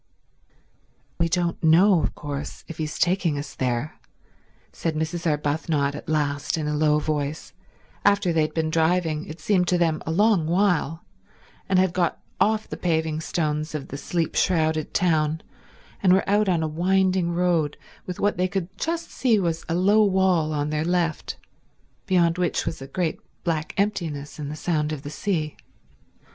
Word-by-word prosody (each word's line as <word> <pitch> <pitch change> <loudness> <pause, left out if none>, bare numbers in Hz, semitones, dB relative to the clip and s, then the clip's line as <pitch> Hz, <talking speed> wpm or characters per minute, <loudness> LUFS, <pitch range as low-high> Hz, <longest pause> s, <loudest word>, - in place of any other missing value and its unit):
"We 165 0 +2
don't 170 -1 -1
know 170 +3 +6
of - - -2
course 145 0 -6
if 165 - -9
he's 155 -1 -3
taking 175 -4 +1
us 145 0 -6
there," 125 +3 -2 0.7
said 165 -2 -2
Mrs. 160 +2 -1
Arbuthnot 150 -1 0
at 150 - -8
last 145 -1 0
in 155 -2 -2
a 150 - -1
low 150 0 +3
voice, 150 -1 -3 0.5
after 200 -3 +3
they 160 - +3
had 155 0 -1
been 160 -1 0
driving 160 -1 +1
as - - -7
it - - -25
seemed 180 +2 +2
to 180 - +3
them 165 -3 +1
a - - -5
long 200 -2 +3
while, 175 -3 +1 0.6
and 190 - +3
had 185 -1 +3
got 175 -2 0 0.2
off 215 0 +2
the - - -6
paving 160 -2 0
stones 155 -1 -2
of 140 -2 -5
the - - -6
sleep 165 +2 -2
shrouded 160 -3 +1
town 160 -3 +1 0.6
and 185 -2 +5
were 190 - +2
out 205 0 +3
on 170 -3 +2
a - - 0
winding 185 +2 +1
road 170 -4 +1 0.3
with 180 - -5
what 205 0 +1
they 180 +1 +2
could 190 0 -4
just 335 +1 -2
see 240 -4 +2
was 165 -3 -1
a 165 - +1
low 200 +4 +4
wall 190 -5 +2
on 150 0 -1
their 155 0 0
left 170 -2 -1 0.7
beyond 175 -2 +3
which 175 -2 0
was 165 -3 -4
a 135 - -7
great 165 +3 -2 0.2
black 160 -1 -2
emptiness 165 -9 -2
and 145 -1 -4
the 150 - -5
sound 155 -1 -1
of 150 -3 -5
the 145 - -6
sea. 155 -3 -2
165 Hz, 175 wpm, -24 LUFS, 155-180 Hz, 0.7 s, know